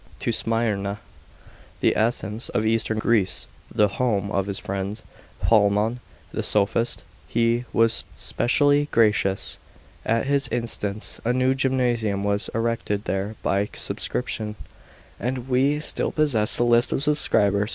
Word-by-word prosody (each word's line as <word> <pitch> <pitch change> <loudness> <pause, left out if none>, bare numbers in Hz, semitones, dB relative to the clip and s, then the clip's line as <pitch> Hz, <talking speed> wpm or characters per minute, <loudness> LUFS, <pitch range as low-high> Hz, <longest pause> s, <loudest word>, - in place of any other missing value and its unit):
To - - 0
Smyrna, 105 -3 0 0.8
the - - +2
Athens 110 0 -1
of 110 - 0
eastern 110 0 +1
Greece, 105 -7 +1 0.3
the 105 - +3
home 100 -2 -1
of 100 -1 0
his 100 -1 -2
friend 100 +2 -4 0.5
Polemon 105 +2 +3 0.3
the - - -2
sophist, 110 +3 +1 0.2
he 115 +1 +1
was 115 0 +2
specially 145 +3 +2
gracious. 105 -4 +2 0.4
At 115 +2 +1
his 140 0 +2
instance 110 -3 -3
a 120 - +1
new 130 +1 +2
gymnasium 120 -6 0
was 100 +1 -1
erected 115 -3 -1
there 100 +2 -2
by 100 +1 +1
subscription, 110 -3 -3 0.6
and 125 0 -3
we 135 +3 +2
still 150 - 0
possess 130 -9 +2
the - - +2
list 120 0 +3
of 135 - 0
subscribers. 105 -9 +2
115 Hz, 130 wpm, -24 LUFS, 100-125 Hz, 0.8 s, the